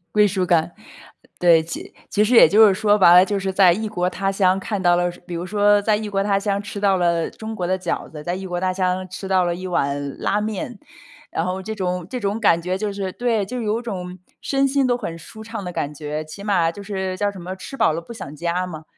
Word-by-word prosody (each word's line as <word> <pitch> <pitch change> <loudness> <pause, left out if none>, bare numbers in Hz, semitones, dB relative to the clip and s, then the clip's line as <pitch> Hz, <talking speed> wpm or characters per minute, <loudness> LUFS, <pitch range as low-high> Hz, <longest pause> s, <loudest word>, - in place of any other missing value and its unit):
归 210 -1 +4
属 190 -1 -1
感， 170 -1 +2 0.7
对， 170 -2 +5
其 165 - -8 0.2
其 210 - +2
实 235 +4 +1
也 - - +9
就 215 +1 +6
是 195 - +2
说 210 +1 +3
白 175 -3 +7
了， 180 - +8
就 200 +1 -1
是 190 0 -2
在 185 -2 +6
异 215 +5 -2
国 180 -3 -1
他 195 +1 -1
乡 195 -1 +2
看 200 -1 -3
到 175 -1 +4
了 175 0 +1 0.2
比 175 - -6
如 170 +2 -4
说 205 +1 +3
在 210 0 +2
异 215 0 -4
国 195 0 0
他 200 -1 +1
乡 200 0 -1
吃 205 0 -7
到 195 -2 +2
了 170 -2 +1
中 220 0 -7
国 180 -4 -3
的 185 +1 0
饺 180 -2 -3
子， 150 -1 -9
在 175 +3 -2
异 190 +1 -6
国 175 -1 -3
他 185 0 0
乡 185 0 -1
吃 185 +2 -7
到 190 -1 +2
了 175 0 0
一 185 +2 -6
碗 140 -5 -2
拉 205 - 0
面。 215 +1 -4 0.5
然 165 - -2
后 185 +1 -3
这 220 +3 -5
种 180 -3 -3
这 250 - -4
种 205 +2 -1
感 170 -6 +3
觉 180 +2 -2
就 205 +1 -2
是 195 -2 -3
对， 225 -2 -1
就 250 +5 -6
是 235 - -3
有 215 +2 0
种 185 -6 -6 0.2
身 275 0 +1
心 275 0 +2
都 245 -1 +1
很 170 -8 -5
舒 220 +6 -11
畅 220 -2 -6
的 180 - -5
感 145 -3 -3
觉， 150 +1 -4
起 155 +6 -10
码 175 -6 +2
就 200 - -9
是 190 -2 -3
叫 205 +2 0
什 200 - -11
么， 185 +2 -6
“吃 230 - -9
饱 270 - +3
了 170 - -4
不 235 - -10
想 150 -10 -8
家” 170 +3 -1
嘛。 155 -3 -8
190 Hz, 280 characters per minute, -21 LUFS, 175-210 Hz, 0.7 s, 也